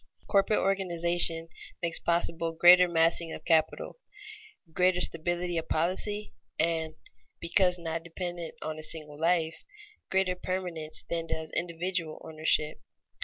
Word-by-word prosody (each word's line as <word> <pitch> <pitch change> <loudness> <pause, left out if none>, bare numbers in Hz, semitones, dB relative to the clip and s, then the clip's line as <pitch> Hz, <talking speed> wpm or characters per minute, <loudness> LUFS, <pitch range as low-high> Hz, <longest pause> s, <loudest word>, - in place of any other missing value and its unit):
Corporate 200 +1 +3
organization 175 -3 +1 0.4
makes 170 0 +1
possible 170 -1 0
greater 180 +2 +8
massing 165 0 +2
of 155 - -9
capital, 165 - +1 0.7
greater 180 +1 +3
stability 175 0 0
of 160 - -8
policy, 200 +6 -1 0.2
and 160 -1 0 0.4
(because 180 +1 +3
not 165 -1 -4
dependent 170 0 -6
on 155 0 -4
a - - -6
single 150 -2 -5
life) 165 -1 +1 0.5
greater 190 -1 +2
permanence 180 -4 -4
than 165 -1 -3
does 160 -1 -4
individual 170 -1 -2
ownership. 155 -1 0
170 Hz, 120 wpm, -29 LUFS, 160-180 Hz, 0.7 s, greater